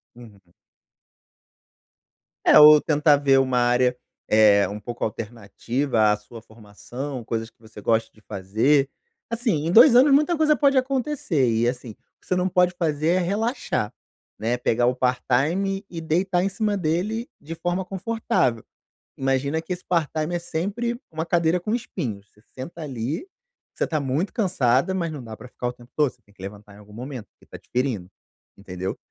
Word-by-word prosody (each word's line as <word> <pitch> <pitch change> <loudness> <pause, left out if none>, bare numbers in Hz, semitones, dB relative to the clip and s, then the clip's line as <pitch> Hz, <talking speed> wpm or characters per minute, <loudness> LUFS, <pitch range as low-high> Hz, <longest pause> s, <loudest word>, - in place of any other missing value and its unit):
Uhum. 110 -5 -15 2.0
É, - - +8
ou 150 0 +10
tentar 150 -1 +3
ver 135 -1 +4
uma 130 -1 +1
área, 125 +1 +2 0.3
eh, 105 -2 +5
um 105 +1 -6
pouco 120 +3 -6
alternativa 115 +2 -1
à - - +2
sua 110 +2 -13
formação, 115 +5 -8
coisas 115 0 -3
que - - -45
você 110 -2 -13
goste 115 +2 +1
de 110 - -22
fazer. 110 +9 +1 0.4
Assim, 225 - -1
em - - 0
2 235 - +8
anos 265 +4 +6
muita 305 +4 +3
coisa 305 -1 +4
pode 280 -2 +3
acontecer, 255 - 0
e 115 +1 +1
assim, 125 -1 -4
o - - -15 0.3
que - - -23
você 185 - +1
não 180 0 +1
pode 180 -1 +2
fazer 155 -3 -1
é 180 +2 +3
relaxar, 200 - -1 0.5
né. 115 +3 0
Pegar 120 0 +1
o 125 +1 +2
part-time 145 - 0
e 170 - -6
deitar 175 +3 0
em 195 - +1
cima 210 +1 -1
dele 190 +8 -1
de 160 +3 -7
forma 175 +3 -2
confortável. 195 - -1 0.5
Imagina 135 +4 0
que 165 +3 -4
esse 180 - -9
part-time 160 -1 -1
é - - -1
sempre 205 +9 -3
uma 160 0 -3
cadeira 170 0 +2
com 210 +5 -3
espinhos, 125 - -5
você 105 - -26
senta 165 +6 -8
ali, 140 - -4 0.5
você - - -1
tá 155 - -1
muito 140 +7 -2
cansada, 175 - +1
mas 170 -3 -2
não 145 -4 -7
dá 110 -2 -9
pra - - -11
ficar 125 0 -5
o 120 - -3
tempo 120 0 -18
todo, 150 -4 +2
você 125 - -29
tem 100 - -26
que 95 - -17
levantar 100 +1 -10
em - - -15
algum 105 0 -16
momento, 125 0 -7
porque - - -25
tá - - -11
te - - -27
ferindo, 120 -8 -1 0.5
entendeu. 95 -1 -5
140 Hz, 180 wpm, -23 LUFS, 115-180 Hz, 2.0 s, ou